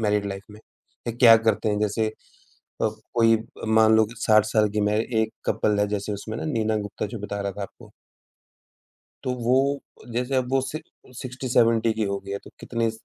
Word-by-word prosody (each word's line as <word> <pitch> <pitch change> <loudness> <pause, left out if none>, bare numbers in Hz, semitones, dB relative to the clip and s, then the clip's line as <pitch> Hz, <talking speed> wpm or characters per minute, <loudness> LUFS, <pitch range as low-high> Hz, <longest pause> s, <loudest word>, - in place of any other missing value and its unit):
Married 105 -2 +1
life 100 0 -5
में। 105 +1 -13 0.5
या 120 - -1
क्या 115 -2 +8
करते 110 -1 +1
हैं 105 0 0
जैसे, 105 +1 +1 0.8
अब - - -1
कोई 115 -1 +5 0.3
मान 110 0 +5
लो 110 0 +5
60 110 -3 +4
साल 110 -1 +2
की 105 +1 -1
मैं 105 +1 +2 0.2
1 110 0 -2
कपल 105 -1 +1
है 105 - +2
जैसे 105 0 -2
उसमें 110 +2 -6
नीना 110 -7 0
गुप्ता 105 0 -4
जो - - -5
बता 100 0 -4
रहा 100 0 -2
था 100 - -8
आपको। 100 - -10 1.3
तो 130 - -1
वो, 130 +3 +1 0.3
जैसे 125 +3 -1
अब 125 -1 0
वो 135 - +4
60-70 120 -5 -1
की 110 -1 -1
हो 100 - -1
गई 100 - -4
है 100 - -2
तो - - -12
कितने 115 -1 -1
110 Hz, 185 wpm, -25 LUFS, 105-120 Hz, 1.3 s, क्या